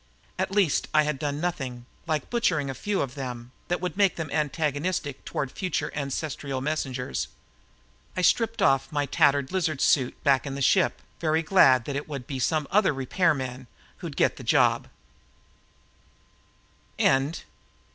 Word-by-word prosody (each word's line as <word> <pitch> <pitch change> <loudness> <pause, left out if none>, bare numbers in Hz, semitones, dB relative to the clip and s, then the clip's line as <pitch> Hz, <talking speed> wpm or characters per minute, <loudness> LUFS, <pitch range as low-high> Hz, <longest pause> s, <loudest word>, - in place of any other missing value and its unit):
At - - 0
least 195 -6 +2
I 155 - +6
had 150 -2 -2
done 145 0 -2
nothing, 130 -8 -3 0.2
like 155 -3 -2
butchering 165 - +1
a - - -5
few 205 +8 -1
of 130 -3 -6
them, 125 -3 -6 0.2
that 175 - 0
would 180 0 -3
make 200 -2 +3
them 160 -3 -5
antagonistic 150 0 -1
toward 135 -2 -3
future 185 -2 -2
ancestral 140 -1 -3
messengers. 130 - -2 0.9
I 185 - 0
stripped 225 +3 +2
off 135 -4 +3
my 145 -1 0
tattered 140 -2 +2
lizard 165 -7 0
suit 130 -4 +3
back 140 0 +3
in 135 - -4
the - - -5
ship, 185 +7 +2 0.2
very 160 0 +1
glad 135 - +5
that 140 - -4
it 145 +2 -4
would 140 -4 -5
be 135 -2 -5
some 150 +3 0
other 190 -6 +3
repairman 130 -3 0 0.3
who'd - - -7
get - - +2
the - - -9
job. - - +3
145 Hz, 150 wpm, -26 LUFS, 135-170 Hz, 0.9 s, I